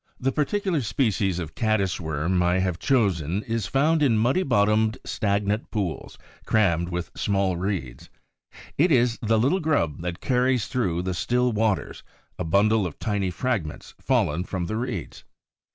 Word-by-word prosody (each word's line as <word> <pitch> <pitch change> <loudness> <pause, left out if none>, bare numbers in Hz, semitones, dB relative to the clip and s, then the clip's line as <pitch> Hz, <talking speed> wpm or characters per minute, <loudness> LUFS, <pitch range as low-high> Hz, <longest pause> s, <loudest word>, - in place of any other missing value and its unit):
The 135 +1 0
particular 170 +3 0
species 110 -6 0
of 80 -4 -5
Caddis 110 -5 0
worm 80 +3 0
I 90 +1 +2
have 90 -2 -1
chosen 100 - +1
is 115 -3 -2
found 150 +7 +2
in 125 -7 +3
muddy 125 +11 +2
bottomed, 110 - +2
stagnant 100 +1 -1
pools 100 -7 -4 0.3
crammed 85 -6 +2
with 90 -1 -4
small 100 -3 0
reeds. 90 -9 -4 0.7
It 170 +3 +4
is 120 -3 +3
the 110 0 +2
little 135 - +2
grub 145 - 0
that 85 +1 -4
carries 125 -2 +1
through 90 -10 -1
the 95 0 -2
still 125 +8 +1
waters 110 -3 -1 0.4
a - - -1
bundle 100 +4 +2
of 80 - -10
tiny 100 -4 -1
fragments 95 -5 -3
fallen 80 +5 +1
from 95 -1 -3
the 110 +5 -3
reeds. 120 - -5
105 Hz, 150 wpm, -25 LUFS, 90-125 Hz, 0.7 s, It